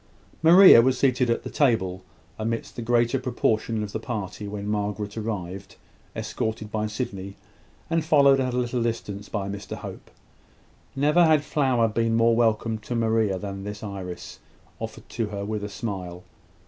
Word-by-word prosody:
Maria 170 -5 +9
was 130 +1 +2
seated 125 -2 +2
at 115 - 0
the - - -5
table, 95 -10 +1 0.4
amidst 115 +1 -3
the 120 - -5
greater 120 +2 +2
proportion 115 -3 0
of 105 - -6
the 110 - -3
party, 105 -3 -5
when 100 0 -5
Margaret 105 0 -2
arrived, 100 -4 -5 0.4
escorted 110 -1 -3
by 110 0 -1
Sydney, 100 -3 -5 0.5
and 165 -1 0
followed 140 -3 +5
at 130 -1 -1
a - - 0
little 125 0 -1
distance 105 -3 -3
by 100 -3 -3
Mr 100 -1 -6
Hope. - - -9 0.9
Never 150 +5 +4
had 155 -2 +4
flower 130 -7 +2
been 115 +1 0
more 115 0 +4
welcome 115 -1 +1
to 115 +3 -5
Maria 110 -4 +1
than 100 0 -6
this 105 +1 -7
iris, 95 -4 -7 0.4
offered - - -7
to 115 -2 -2
her 100 -1 -5
with 105 0 -3
a 105 - -4
smile. 95 -4 -5
110 Hz, 160 wpm, -25 LUFS, 100-120 Hz, 0.9 s, Maria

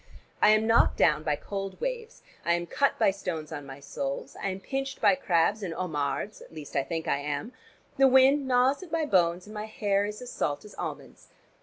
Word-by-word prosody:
I - - +7
am 215 +1 +4
knocked 225 +1 +4
down 150 -2 +4
by 150 -1 0
cold 195 +4 -6
waves, 485 -1 -5 0.2
I 170 - +2
am 175 0 -1
cut 280 +10 +1
by - - +4
stones 165 -6 -5
on 145 -3 -6
my 135 0 -9
soles. 140 -1 -5
I 195 - -1
am 190 0 -4
pinched 270 +6 -4
by - - +5
crabs 200 -5 +1
and 175 -5 -4
homards, 160 +4 -3
at - - -14
least 155 -3 -10
I 140 - +3
think 165 +2 -4
I 140 - +1
am; 145 - -4 0.5
the 270 - +7
wind 265 +2 +5
gnaws 255 +4 +3
at 365 -4 -11
my 325 -1 0
bones, 180 - +2
and 210 - -11
my 210 0 -4
hair 205 -2 0
is 210 0 -6
as 250 0 -8
salt 145 +6 -2
as 210 - -12
almonds. - - -7
195 Hz, 215 wpm, -28 LUFS, 160-255 Hz, 0.5 s, I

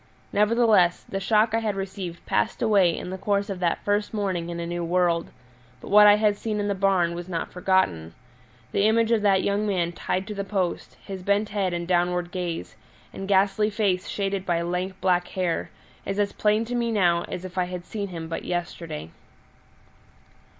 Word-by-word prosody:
Nevertheless, 210 -4 +3
the 195 - -4
shock 215 +2 +2
I 225 - +3
had 215 -3 -2
received 190 -3 -6
passed 225 - 0
away 195 -6 +4
in 180 - -6
the 190 - -5
course 200 +1 0
of 190 - -5
that 175 -2 0
first 205 +1 0
morning 185 -5 -2
in 170 0 -5
a 170 - -3
new 175 0 -3
world; 170 -1 +1 0.5
but - - -10
what 210 0 +8
I 205 - +8
had 210 -1 +2
seen 215 -1 -3
in 205 - -1
the 200 - +1
barn 190 -3 +2
was 175 +1 -7
not 165 -2 -3
forgotten: 180 - 0 0.6
the 200 - +2
image 225 +1 +2
of 225 -2 +3
that 195 -2 +3
young 205 +1 0
man 175 -4 0
tied 185 +2 -2
to 210 - -6
the 200 -1 -3
post, 195 -3 -3
his 190 -2 -6
bent 200 +3 +1
head 195 -3 -1
and 170 0 -3
downward 175 0 +1
gaze, 175 - -4 0.4
and 195 - -6
ghastly 200 +2 +3
face 200 -4 0
shaded 195 -1 -2
by 170 -2 0
lank 180 +2 -3
black 180 -1 +2
hair, 180 -3 -2 0.3
is 195 - -3
as 205 -1 0
plain 215 +1 +1
to 240 - -5
me 235 -1 0
now 175 -5 +2
as 180 - -6
if 185 0 -9
I 185 -1 +1
had 180 0 -6
seen 205 -2 -4
him 165 -3 -6
but 165 - -4
yesterday. 170 - -4
190 Hz, 200 wpm, -25 LUFS, 175-205 Hz, 0.6 s, what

